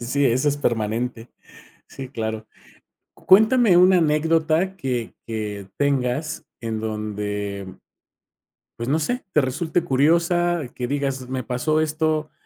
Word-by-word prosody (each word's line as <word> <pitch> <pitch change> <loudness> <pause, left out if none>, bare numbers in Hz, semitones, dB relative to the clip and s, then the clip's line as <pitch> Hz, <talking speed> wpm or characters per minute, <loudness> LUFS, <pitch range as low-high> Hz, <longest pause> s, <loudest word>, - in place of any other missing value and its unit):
sí, 140 +4 0
eso 130 +4 +2
es 145 - 0
permanente. 115 -1 -2 0.6
Sí, 135 -1 -8
claro. 110 -3 -4 0.7
Cuéntame 220 0 +5
una 185 +1 +6
anécdota 160 +3 +2
que 125 -8 -3
que 105 -3 -5
tengas, 140 +2 -1 0.2
en 110 -1 -3
donde 105 -3 -4 1.0
pues 120 - -3
no 150 - +3
sé, 245 +11 -2
te 150 - +5
resulte 160 +6 -1
curiosa, 170 +4 +2
que 125 -1 -3
digas: 135 -2 -2
"Me 130 -1 -3
pasó 140 +7 0
esto 155 0 -1
135 Hz, 120 wpm, -22 LUFS, 115-160 Hz, 1.0 s, una